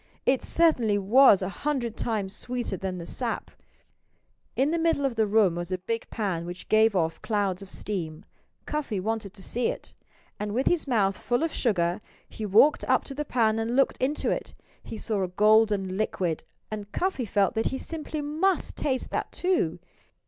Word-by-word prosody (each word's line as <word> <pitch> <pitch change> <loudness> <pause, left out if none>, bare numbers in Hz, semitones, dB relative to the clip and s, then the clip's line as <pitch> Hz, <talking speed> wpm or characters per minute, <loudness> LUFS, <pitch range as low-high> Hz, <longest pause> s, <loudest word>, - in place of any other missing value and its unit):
It 260 0 +3
certainly 250 -11 +3
was 205 0 +6
a 185 - -2
hundred 245 -1 -2
times 210 -4 -2
sweeter 245 -4 -3
than 185 -1 -4
the 170 - -6
sap. 235 +5 -3 1.0
In 275 +4 +2
the 335 - 0
middle 325 -4 +2
of 270 - 0
the 220 -1 +2
room 205 -4 +4
was 175 +1 -4
a 185 - 0
big 225 +5 -4
pan 195 -7 -2
which 175 +1 -8
gave 220 -1 +4
off 165 -2 0
clouds 200 -4 -1
of 195 - -10
steam. 175 -4 -4 0.4
Cuffy 285 -9 -2
wanted 215 0 -2
to 195 - -11
see 240 +4 -1
it. - - -5 0.5
And 210 0 -3
with 260 - +1
his 345 -4 +2
mouth 200 -6 +1
full 245 +5 0
of 330 - -1
sugar 180 -4 0 0.3
he 215 - -6
walked 225 +10 +5
up - - +3
to 275 - -7
the 295 +2 -3
pan 225 -4 +2
and 225 +2 -1
looked 275 - +2
into 275 +4 0
it. - - -4 0.3
He 225 - -8
saw 215 -2 -2
a 185 - 0
golden 205 0 +3
liquid, 185 -6 -1 0.3
and 210 -1 -6
Cuffy 365 -9 -1
felt 200 0 +1
that 225 -1 0
he 265 - -2
simply 310 0 -4
must 320 +6 0
taste 260 -3 -2
that - - -2
too. 355 - 0
220 Hz, 185 wpm, -27 LUFS, 195-260 Hz, 1.0 s, was